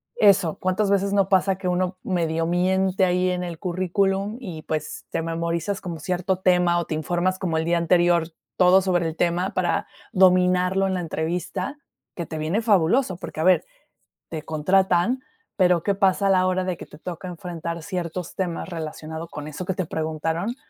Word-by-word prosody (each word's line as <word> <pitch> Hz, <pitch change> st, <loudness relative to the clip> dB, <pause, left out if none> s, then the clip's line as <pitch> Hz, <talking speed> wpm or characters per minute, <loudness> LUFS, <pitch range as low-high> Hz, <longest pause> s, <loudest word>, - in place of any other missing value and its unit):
eso, 200 Hz, -6 st, +4 dB
¿cuántas 185 Hz, +2 st, 0 dB
veces 200 Hz, 0 st, +2 dB
no 195 Hz, -1 st, +2 dB
pasa 190 Hz, 0 st, +3 dB
que 190 Hz, -, -4 dB
uno 180 Hz, +1 st, 0 dB
medio 165 Hz, -3 st, -1 dB
miente 190 Hz, +2 st, +2 dB
ahí 180 Hz, 0 st, +1 dB
en 180 Hz, 0 st, -1 dB
el 170 Hz, -3 st, -6 dB
currículum? 195 Hz, +4 st, 0 dB
Y, 175 Hz, -11 st, -7 dB
pues, 155 Hz, -1 st, -4 dB
te -, -, -1 dB
memorizas 170 Hz, +4 st, -2 dB
como 170 Hz, -4 st, -6 dB
cierto 185 Hz, +3 st, -1 dB
tema 180 Hz, -2 st, +3 dB
o 170 Hz, -, -2 dB
te 155 Hz, -, -3 dB
informas 175 Hz, +4 st, 0 dB
como 170 Hz, -4 st, -1 dB
el 160 Hz, -, -1 dB
día 170 Hz, +1 st, +2 dB
anterior 170 Hz, 0 st, +3 dB, 0.3 s
todo 185 Hz, +1 st, +6 dB
sobre 175 Hz, -3 st, +1 dB
el 160 Hz, -, -4 dB
tema 175 Hz, +3 st, 0 dB
para 185 Hz, -1 st, 0 dB, 0.3 s
dominarlo 185 Hz, +1 st, +4 dB
en 190 Hz, -, -1 dB
la 180 Hz, -, -2 dB
entrevista, 175 Hz, -, -3 dB, 0.4 s
que 170 Hz, -, -4 dB
te 160 Hz, -, -6 dB
viene 170 Hz, +9 st, -1 dB
fabuloso, 200 Hz, 0 st, +3 dB
porque, 155 Hz, -, -6 dB
a -, -, +1 dB
ver, 185 Hz, +1 st, +5 dB, 0.7 s
te 160 Hz, -2 st, -4 dB
contratan, 185 Hz, -, +2 dB, 0.3 s
pero, 180 Hz, -3 st, +3 dB
¿qué 200 Hz, -, +2 dB
pasa 195 Hz, 0 st, +2 dB
a -, -, +4 dB
la 185 Hz, -1 st, +4 dB
hora 185 Hz, 0 st, 0 dB
de 185 Hz, -1 st, -2 dB
que -, -, -10 dB
te 150 Hz, -, -14 dB
toca 180 Hz, +2 st, -7 dB
enfrentar 170 Hz, -1 st, -5 dB
ciertos 180 Hz, -2 st, -4 dB
temas 180 Hz, -3 st, -3 dB
relacionado 160 Hz, -1 st, -6 dB
con 150 Hz, -2 st, -7 dB
eso 155 Hz, +4 st, -6 dB
que 185 Hz, 0 st, -2 dB
te 185 Hz, -4 st, -2 dB
preguntaron? 160 Hz, +8 st, -2 dB
180 Hz, 185 wpm, -24 LUFS, 170-190 Hz, 0.7 s, todo